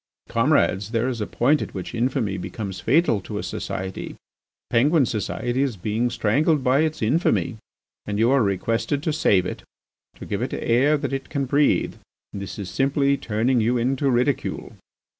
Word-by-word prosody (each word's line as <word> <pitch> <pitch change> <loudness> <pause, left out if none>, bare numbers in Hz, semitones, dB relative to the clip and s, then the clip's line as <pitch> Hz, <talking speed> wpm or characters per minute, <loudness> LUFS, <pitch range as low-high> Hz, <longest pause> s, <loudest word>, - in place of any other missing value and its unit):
"Comrades, 115 - +2
there 115 +2 +1
is 120 -4 -3
a 105 - -2
point 145 +5 +2
at - - -6
which 95 - -5
infamy 115 -4 0
becomes 95 0 -5
fatal 120 - +2
to - - -6
a - - -3
society. 95 0 -5 0.6
Penguin 140 +5 +4
society 120 +3 -2
is 135 -7 -1
being 110 +6 -1
strangled 140 +7 +1
by 130 +2 +3
its 155 -5 0
infamy, 130 -1 +1 0.5
and 105 -1 -2
you 115 +4 +3
are 135 -1 +4
requested 115 +7 0
to 160 -3 0
save 100 - +3
it, - - -5 0.5
to - - -10
give - - -3
it - - -2
air 135 +6 +2
that 140 - -3
it 135 - -4
can 140 -2 -1
breathe. 145 +3 +2 0.4
This 100 -1 -6
is 100 -3 -5
simply 140 +1 +2
turning 120 +1 0
you 120 +3 +2
into 135 +3 +1
ridicule. 125 +2 -1
120 Hz, 170 wpm, -23 LUFS, 110-140 Hz, 0.6 s, Penguin